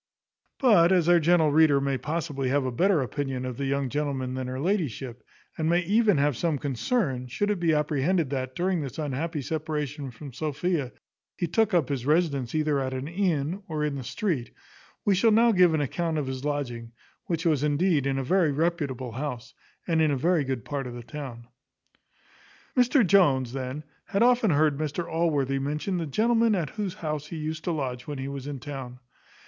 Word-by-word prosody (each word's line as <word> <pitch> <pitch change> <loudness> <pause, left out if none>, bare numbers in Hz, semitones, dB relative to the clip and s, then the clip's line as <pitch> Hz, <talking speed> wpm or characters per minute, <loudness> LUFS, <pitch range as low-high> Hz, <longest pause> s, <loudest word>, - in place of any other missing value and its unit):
But 190 -10 +5
as 180 -3 +3
our 175 0 +6
gentle 160 -1 +4
reader 150 -2 +5
may 140 0 0
possibly 145 -2 -2
have 140 0 +1
a 130 - -1
better 175 +3 +2
opinion 130 -1 -3
of 125 -2 -5
the 140 - -2
young 140 0 0
gentleman 135 -2 -2
than 130 -1 -3
her 130 +1 -4
ladyship, 140 - -2 0.4
and 160 0 +1
may 175 +1 +3
even 205 +1 +3
have 145 -1 +2
some 160 +4 0
concern, 135 - -1
should 205 +12 -1
it 205 - -1
be 170 -1 +2
apprehended 150 +1 +1
that, 130 -1 -3
during 180 -1 0
this 135 -5 -6
unhappy 150 +1 -3
separation 150 -2 -3
from 130 +3 -10
Sophia, 155 -1 -2 0.5
he 175 - 0
took 200 +4 +1
up 160 -7 +3
his 135 -4 -2
residence 150 -6 +1
either 155 -2 +1
at 130 -1 -2
an 130 +2 -4
inn, 170 -1 -1
or 155 -2 -2
in 150 -1 0
the 135 -2 -5
street; 165 - -2 0.6
we 205 - +4
shall 195 +5 +4
now 230 +2 +5
give 180 -4 +5
an 155 - +1
account 160 +3 -1
of 150 - -1
his 130 0 -5
lodging, 120 -6 -3 0.3
which 165 -1 -2
was 155 -5 +2
indeed 150 -1 +2
in 135 0 0
a 135 - -1
very 170 +2 +2
reputable 140 -5 -1
house, 130 -1 -5 0.3
and 165 -2 +2
in 155 - +3
a 140 - +1
very 165 +3 +2
good 130 -5 -3
part 140 -3 -3
of 120 - -7
the 120 - -8
town. 120 -2 -8 1.3
Mr 250 -1 +4
Jones, 140 -10 +3
then, 135 +2 -4 0.2
had 200 +3 +1
often 245 -3 +4
heard 150 -2 +2
Mr 155 +3 -2
Allworthy 145 -5 0
mention 150 +7 -2
the 165 - -3
gentlewoman 225 - +2
at 165 -6 -2
whose 205 -5 -4
house 150 -2 -4
he 165 - -6
used 155 0 -4
to 175 - 0
lodge 130 -6 -3
when 145 -1 -4
he 135 0 -4
was 140 -1 -6
in 145 -2 -5
town. 130 -2 -7
150 Hz, 195 wpm, -26 LUFS, 135-170 Hz, 1.3 s, our